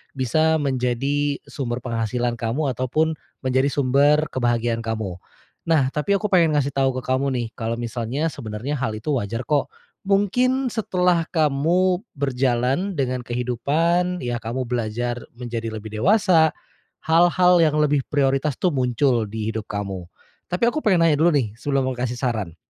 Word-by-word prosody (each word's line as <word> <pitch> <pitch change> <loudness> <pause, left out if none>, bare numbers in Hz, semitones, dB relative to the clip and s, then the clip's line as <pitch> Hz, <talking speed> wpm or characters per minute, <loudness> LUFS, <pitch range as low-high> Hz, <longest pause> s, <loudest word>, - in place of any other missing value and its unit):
bisa 155 +5 +2
menjadi 140 +2 0
sumber 120 -3 -4
penghasilan 120 0 -1
kamu 130 +5 -1
ataupun, 155 +6 0 0.3
menjadi 130 +1 +2
sumber 145 +3 +3
kebahagiaan 120 -2 0
kamu. 110 -5 -4 0.5
Nah, 145 -5 +3
tapi 155 +8 0
aku 210 +2 0
pengen 165 -5 +4
ngasih 140 -1 +1
tau 135 -1 +3
ke 130 - -4
kamu 130 +2 0
nih, 120 -3 -2
kalo 115 0 -2
misalnya 120 +5 -2
sebenarnya 120 +2 -5
hal 110 -4 -2
itu 115 +8 -4
wajar 115 0 -3
kok. 145 +3 +1 0.4
Mungkin 250 +6 +2
setelah 180 -6 +1
kamu 170 +4 +1
berjalan 135 +6 0
dengan 130 -3 -1
kehidupan, 145 +10 0
ya 120 -1 -2
kamu 120 +3 -3
belajar 120 0 -2 0.2
menjadi 120 -2 -5
lebih 110 0 -7
dewasa, 180 - +4 0.5
hal-hal 175 +2 +4
yang 155 -2 +3
lebih 150 -1 +3
prioritas 135 0 +1
tuh 180 - 0
muncul 125 -3 +1
di 110 +1 -3
hidup 110 -1 -5
kamu. 100 -4 -5 0.4
Tapi 180 +5 -1
aku 310 - -2
pengen 190 - +3
nanya 150 -3 +2
dulu 165 0 +4
nih, 120 -7 +1
sebelum 140 0 0
mau - - -5
kasih 125 0 -2
saran. 110 - -2
135 Hz, 150 wpm, -22 LUFS, 120-160 Hz, 0.5 s, pengen